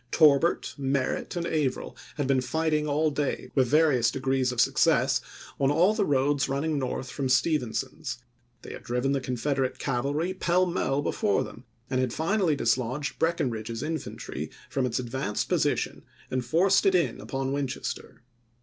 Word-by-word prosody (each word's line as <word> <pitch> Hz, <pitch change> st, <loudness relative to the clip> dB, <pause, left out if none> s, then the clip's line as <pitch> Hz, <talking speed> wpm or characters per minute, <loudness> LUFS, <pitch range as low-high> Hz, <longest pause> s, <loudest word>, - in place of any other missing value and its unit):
Torbert, 155 Hz, +1 st, +4 dB
Merritt, 135 Hz, +3 st, -1 dB
and 170 Hz, -1 st, -2 dB
Averill 150 Hz, -6 st, -1 dB, 0.2 s
had 145 Hz, -, -1 dB
been 135 Hz, -1 st, +2 dB
fighting 155 Hz, +2 st, 0 dB
all 150 Hz, +2 st, +1 dB
day, 145 Hz, -1 st, -2 dB
with 130 Hz, -3 st, +3 dB
various 140 Hz, -5 st, +4 dB
degrees 130 Hz, 0 st, 0 dB
of 125 Hz, -, -4 dB
suc 135 Hz, +4 st, +3 dB
cess, 130 Hz, -5 st, +3 dB, 0.4 s
on 135 Hz, -1 st, +3 dB
all 170 Hz, +8 st, +4 dB
the 210 Hz, -2 st, 0 dB
roads 140 Hz, 0 st, +2 dB
running 145 Hz, +2 st, 0 dB
north 130 Hz, -1 st, -3 dB
from 135 Hz, -2 st, -2 dB
Stephen 135 Hz, -3 st, +2 dB
son's; -, -, -4 dB, 0.5 s
they -, -, -8 dB
had -, -, -8 dB
driven 125 Hz, +3 st, -1 dB
the 140 Hz, -1 st, 0 dB
Confederate 130 Hz, +1 st, -1 dB
cavalry 140 Hz, +7 st, -1 dB
pell 185 Hz, 0 st, +2 dB
mell 145 Hz, -6 st, 0 dB
before 100 Hz, -7 st, +1 dB
them 120 Hz, -, -11 dB, 0.2 s
and 130 Hz, -, -1 dB
had 125 Hz, -2 st, -1 dB
finally 170 Hz, -1 st, +1 dB
dislodged 130 Hz, +3 st, -1 dB
Breckinridge's 115 Hz, -8 st, -1 dB
infantry 160 Hz, +1 st, -5 dB, 0.2 s
from 130 Hz, -2 st, +1 dB
its 115 Hz, -, -2 dB
advanced 125 Hz, -3 st, -2 dB
position -, -, 0 dB, 0.3 s
and 130 Hz, -1 st, 0 dB
forced 185 Hz, -, +3 dB
it 190 Hz, -, +4 dB
in 175 Hz, -, +1 dB
upon 135 Hz, -1 st, -3 dB
Winchester. 135 Hz, -3 st, -4 dB
140 Hz, 160 wpm, -27 LUFS, 130-155 Hz, 0.5 s, Torbert